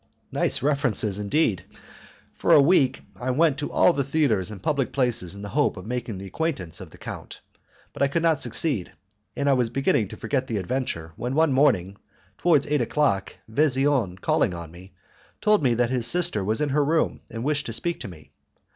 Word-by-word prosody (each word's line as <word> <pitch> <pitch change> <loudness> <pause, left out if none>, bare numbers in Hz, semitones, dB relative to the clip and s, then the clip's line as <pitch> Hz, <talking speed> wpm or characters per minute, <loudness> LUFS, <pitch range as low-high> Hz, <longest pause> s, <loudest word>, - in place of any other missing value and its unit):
Nice - - +1
references, 125 -8 +1
indeed! 105 - 0 0.7
For - - +2
a - - +8
week 140 -3 +3 0.2
I 125 - -3
went 150 +2 +2
to 145 - -4
all 180 - +4
the 140 - 0
theatres 130 - 0
and 105 -2 -8
public 140 +5 -1
places 120 -9 0
in 100 - -9
the 100 - -6
hope 145 -5 +1
of 95 - -8
making 120 -3 -4
the 95 - -8
acquaintance 95 - -3
of - - -9
the - - -16
count, - - -9 0.5
but - - -8
I 140 - +5
could 160 +4 -1
not 160 -4 +3
succeed, 135 - 0 0.4
and 140 - -1
I 140 - +5
was 125 -3 +1
beginning 120 -4 +1
to - - -10
forget 130 -2 -2
the 110 - -2
adventure 95 -6 -3
when 125 +3 -3
one 160 -2 +3
morning, 105 -9 +2 0.4
towards 160 -6 +3
eight 150 -2 0
o'clock 110 -7 0
Vesian 135 -5 +1
calling 90 - +1
on 85 -2 -8
me, 90 +2 -15 0.4
told 210 -1 +3
me 125 -4 +2
that 120 +1 +1
his 125 -3 +1
sister 155 - +3
was 110 +7 -1
in 150 - +1
her 145 +2 +2
room 160 +3 0
and 115 0 -6
wished 145 0 -1
to - - -4
speak 170 +8 -2
to - - -6
me. 75 -6 -13
130 Hz, 200 wpm, -24 LUFS, 100-145 Hz, 0.7 s, a